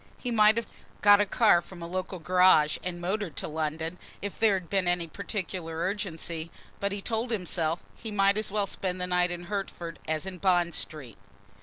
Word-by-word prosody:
He 245 Hz, -, -4 dB
might 215 Hz, -1 st, +5 dB
have 230 Hz, -, 0 dB, 0.4 s
got 205 Hz, 0 st, +8 dB
a 205 Hz, -, +1 dB
car 210 Hz, -5 st, +5 dB
from 175 Hz, 0 st, -11 dB
a -, -, -5 dB
local 185 Hz, +1 st, -3 dB
garage, 180 Hz, -3 st, +4 dB
and 180 Hz, -1 st, -4 dB
motored 185 Hz, -2 st, -2 dB
to -, -, -4 dB
London, 160 Hz, +2 st, -3 dB, 0.2 s
if 200 Hz, 0 st, -6 dB
there 220 Hz, -3 st, +4 dB
had 180 Hz, -3 st, -4 dB
been 190 Hz, -1 st, 0 dB
any 175 Hz, -1 st, +1 dB
particular 180 Hz, -2 st, -5 dB
urgency, 170 Hz, -3 st, -3 dB, 0.3 s
but, 200 Hz, 0 st, -1 dB
he 200 Hz, 0 st, -4 dB
told 230 Hz, +1 st, -1 dB
himself, 175 Hz, -6 st, 0 dB
he 225 Hz, -, -8 dB
might 200 Hz, -1 st, +3 dB
as 215 Hz, -2 st, 0 dB
well 205 Hz, -1 st, +1 dB
spend 185 Hz, -1 st, -3 dB
the 180 Hz, -, 0 dB
night 180 Hz, 0 st, +2 dB
in 175 Hz, 0 st, -5 dB
Hertford 175 Hz, -3 st, -5 dB
as 155 Hz, +2 st, -1 dB
in 185 Hz, -1 st, -6 dB
Bond 175 Hz, -2 st, +2 dB
Street. 130 Hz, -10 st, -5 dB
180 Hz, 195 wpm, -28 LUFS, 170-200 Hz, 0.4 s, got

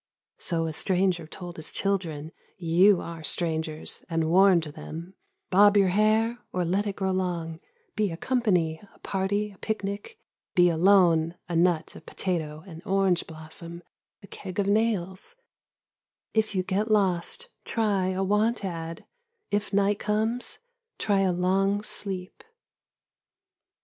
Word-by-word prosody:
So 165 Hz, -2 st, -1 dB
a 160 Hz, -, -3 dB
stranger 180 Hz, -1 st, +1 dB
told 175 Hz, +1 st, -8 dB
his 160 Hz, -, -6 dB
children: 165 Hz, -6 st, -2 dB, 0.3 s
You 180 Hz, +2 st, +4 dB
are 165 Hz, -1 st, -7 dB
strangers 160 Hz, -1 st, -2 dB
— -, -, -40 dB
and 165 Hz, -1 st, 0 dB
warned 185 Hz, -2 st, +6 dB
them: 165 Hz, +3 st, -8 dB, 0.4 s
Bob 205 Hz, +2 st, +6 dB
your 195 Hz, -2 st, +5 dB
hair; 215 Hz, +4 st, +2 dB
or 180 Hz, -1 st, -1 dB
let 195 Hz, +5 st, 0 dB
it 200 Hz, -, -3 dB
grow 190 Hz, -1 st, -1 dB
long; 170 Hz, -3 st, -2 dB, 0.4 s
Be 210 Hz, -2 st, +1 dB
a 165 Hz, -, -5 dB
company, 180 Hz, -10 st, +1 dB
a -, -, -20 dB
party, 200 Hz, +2 st, -1 dB
a 195 Hz, -, -19 dB
picnic; 210 Hz, -, -4 dB, 0.4 s
Be 175 Hz, -1 st, +6 dB
alone, 170 Hz, -2 st, +4 dB
a 175 Hz, -, -3 dB
nut, 170 Hz, -1 st, +2 dB
a -, -, -10 dB
potato, 160 Hz, -3 st, -3 dB
an 165 Hz, -4 st, -10 dB
orange 190 Hz, -2 st, +1 dB
blossom, 165 Hz, +2 st, -7 dB, 0.4 s
a -, -, -11 dB
keg 185 Hz, -2 st, -8 dB
of 200 Hz, -, +2 dB
nails; 200 Hz, -, 0 dB, 1.0 s
if 220 Hz, -2 st, +1 dB
you 185 Hz, -, +1 dB
get 200 Hz, +4 st, -1 dB
lost 200 Hz, -, +1 dB, 0.2 s
try 205 Hz, -5 st, 0 dB
a 190 Hz, +1 st, 0 dB
want 210 Hz, +3 st, +1 dB
ad; 165 Hz, -2 st, -5 dB, 0.5 s
if 205 Hz, 0 st, 0 dB
night 200 Hz, 0 st, +2 dB
comes 220 Hz, +3 st, -1 dB, 0.4 s
try 200 Hz, -2 st, +1 dB
a 190 Hz, -1 st, +3 dB
long 195 Hz, +3 st, +1 dB
sleep. 190 Hz, -3 st, -5 dB
185 Hz, 140 wpm, -27 LUFS, 170-205 Hz, 1.0 s, warned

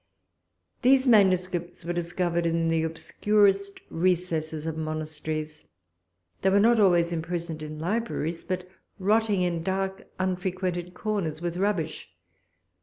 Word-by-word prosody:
These 265 Hz, +1 st, +5 dB
manuscripts 185 Hz, -5 st, +3 dB
were 175 Hz, -, -1 dB
discovered 175 Hz, 0 st, -1 dB
in 165 Hz, 0 st, +1 dB
the 165 Hz, 0 st, +2 dB
obscurest 200 Hz, +4 st, +1 dB
recesses 165 Hz, -3 st, 0 dB
of 160 Hz, -1 st, -2 dB
monasteries; 155 Hz, 0 st, -4 dB, 0.8 s
they 190 Hz, -, +3 dB
were 200 Hz, +1 st, +4 dB
not 230 Hz, +2 st, +5 dB
always 175 Hz, -4 st, +4 dB
imprisoned 165 Hz, -1 st, -3 dB
in 155 Hz, 0 st, -6 dB
libraries, 170 Hz, -2 st, -2 dB
but 185 Hz, -1 st, -3 dB, 0.3 s
rotting 205 Hz, -1 st, +2 dB
in 170 Hz, -2 st, 0 dB
dark 190 Hz, +2 st, -2 dB
unfrequented 180 Hz, -1 st, -2 dB
corners 185 Hz, -8 st, -2 dB
with 175 Hz, 0 st, -3 dB
rubbish. 180 Hz, -5 st, -1 dB
175 Hz, 115 wpm, -27 LUFS, 165-195 Hz, 0.8 s, These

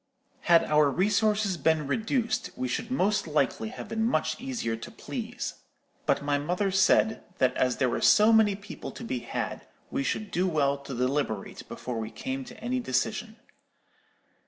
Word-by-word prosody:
"Had 170 Hz, -1 st, +7 dB
our 150 Hz, -1 st, +4 dB
resources 205 Hz, +3 st, +2 dB
been 155 Hz, 0 st, +2 dB
reduced, 225 Hz, -, 0 dB
we 130 Hz, -, -2 dB
should 225 Hz, -, -3 dB
most 210 Hz, -7 st, +1 dB
likely 135 Hz, -7 st, 0 dB
have -, -, -8 dB
been 220 Hz, 0 st, -1 dB
much 230 Hz, 0 st, 0 dB
easier 250 Hz, -, -2 dB
to 115 Hz, -, -8 dB
please; -, -, -6 dB, 0.5 s
but -, -, +2 dB
my 145 Hz, 0 st, +1 dB
mother 180 Hz, +6 st, 0 dB
said, 195 Hz, +3 st, +3 dB
that 130 Hz, -1 st, +2 dB
as 125 Hz, -1 st, +1 dB
there 130 Hz, -, +2 dB
were 120 Hz, -, -1 dB
so 215 Hz, +2 st, +6 dB
many 215 Hz, -3 st, +5 dB
people 200 Hz, +1 st, -8 dB
to -, -, -9 dB
be 130 Hz, -, -2 dB
had, -, -, -4 dB, 0.2 s
we -, -, -1 dB
should 205 Hz, +9 st, -2 dB
do 180 Hz, +2 st, +1 dB
well 145 Hz, -5 st, +2 dB
to 140 Hz, -1 st, -7 dB
deliberate 125 Hz, -4 st, -2 dB
before 125 Hz, -2 st, -5 dB
we 110 Hz, -1 st, -4 dB
came 265 Hz, -, -4 dB
to 240 Hz, -1 st, -11 dB
any 245 Hz, +3 st, -1 dB
decision. 215 Hz, -, -1 dB
180 Hz, 170 wpm, -28 LUFS, 140-220 Hz, 0.5 s, Had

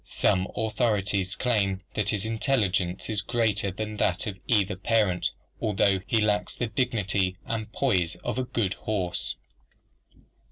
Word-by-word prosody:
Some 95 Hz, 0 st, +1 dB
authorities 105 Hz, -3 st, 0 dB
claim 100 Hz, -5 st, +1 dB
that 105 Hz, -1 st, 0 dB
his 105 Hz, -1 st, -1 dB
intelligence 105 Hz, -6 st, 0 dB
is 105 Hz, -3 st, 0 dB
greater 110 Hz, -2 st, +1 dB
than 105 Hz, +3 st, -4 dB
that 90 Hz, -1 st, +1 dB
of 100 Hz, -4 st, -5 dB
either 105 Hz, -4 st, +3 dB
parent, 100 Hz, -3 st, +2 dB, 0.3 s
although 100 Hz, -2 st, +3 dB
he 115 Hz, -, +3 dB
lacks 105 Hz, -1 st, +1 dB
the 120 Hz, -, -1 dB
dignity 105 Hz, -5 st, 0 dB
and 110 Hz, -2 st, -3 dB
poise 95 Hz, -12 st, +1 dB
of -, -, -2 dB
a -, -, +1 dB
good 110 Hz, -6 st, -1 dB
horse. 90 Hz, -6 st, -1 dB
105 Hz, 135 wpm, -27 LUFS, 95-110 Hz, 0.3 s, either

